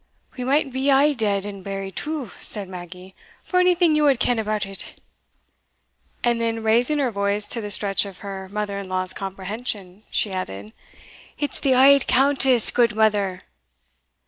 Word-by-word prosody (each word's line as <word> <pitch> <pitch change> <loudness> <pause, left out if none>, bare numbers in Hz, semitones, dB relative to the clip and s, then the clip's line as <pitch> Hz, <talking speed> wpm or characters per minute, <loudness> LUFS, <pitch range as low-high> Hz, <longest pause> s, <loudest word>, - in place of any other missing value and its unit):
"We 250 - -5
might 270 +1 +1
be 265 +2 0
a' 280 +2 +4
dead 205 -5 -1
and 200 -2 -8
buried 195 -1 -5
too," 300 -4 -4
said 205 -3 -3
Maggie, 180 +1 -10 0.3
"for 365 - 0
onything 360 -2 +3
ye 305 - +2
wad 280 -4 +3
ken 245 -2 +1
about 215 -1 -1
it;" 195 0 -5 1.2
and 235 -1 +1
then, 225 -1 -2
raising 240 +7 +2
her 270 -4 0
voice 200 0 0
to 230 - -2
the 205 - -5
stretch 200 -1 0
of 195 -2 -11
her 190 -1 -7
mother 205 0 -3
in 195 -1 -8
law's 185 0 -2
comprehension, 195 0 -4
she 210 - +1
added, 105 - -6 0.6
"It's 290 -2 -3
the 265 -3 +2
auld 275 +1 +6
Countess, 265 -2 +4
gudemither." 210 -5 +1
215 Hz, 160 wpm, -22 LUFS, 195-260 Hz, 1.2 s, auld